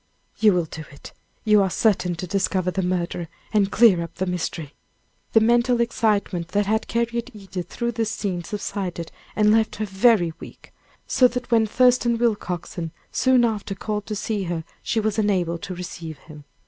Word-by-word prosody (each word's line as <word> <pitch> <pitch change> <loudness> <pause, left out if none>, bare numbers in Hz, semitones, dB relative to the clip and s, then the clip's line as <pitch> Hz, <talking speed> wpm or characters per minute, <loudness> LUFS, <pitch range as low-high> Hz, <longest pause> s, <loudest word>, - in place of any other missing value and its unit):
"You 215 -2 +5
will 175 -2 +1
do 160 0 -8
it! 140 - -12 0.3
You 210 -2 +5
are 190 - +2
certain 180 -3 +1
to 185 - -5
discover 185 0 0
the 190 - -1
murderer, 175 -1 -2 0.3
and 200 -2 +3
clear 210 -6 +5
up 170 - -7
the 185 - -1
mystery." 170 -4 -4 0.6
The 225 - +7
mental 240 +2 +3
excitement 210 -7 0
that 205 +3 0
had 220 +3 0
carried 235 +1 -1
Edith 195 -3 -7
through 235 -1 -2
this 225 -1 -1
scene 190 -5 -3
subsided, 190 -3 -4 0.2
and 210 -1 +4
left 220 0 +2
her 215 - -2
very 190 -3 +3
weak, - - -13 0.3
so 255 - +4
that 250 0 -5
when 225 -1 +4
Thurston 245 0 +3
Willcoxen 180 -7 -2 0.2
soon 255 -2 +4
after 210 -3 -2
called 210 +1 -4
to 215 - -3
see 210 -1 -2
her, 170 -2 -3 0.2
she 230 - 0
was 215 0 0
unable 180 -5 +1
to 185 +2 -6
receive 170 -3 -7
him. 150 0 -14
205 Hz, 175 wpm, -23 LUFS, 180-225 Hz, 0.6 s, The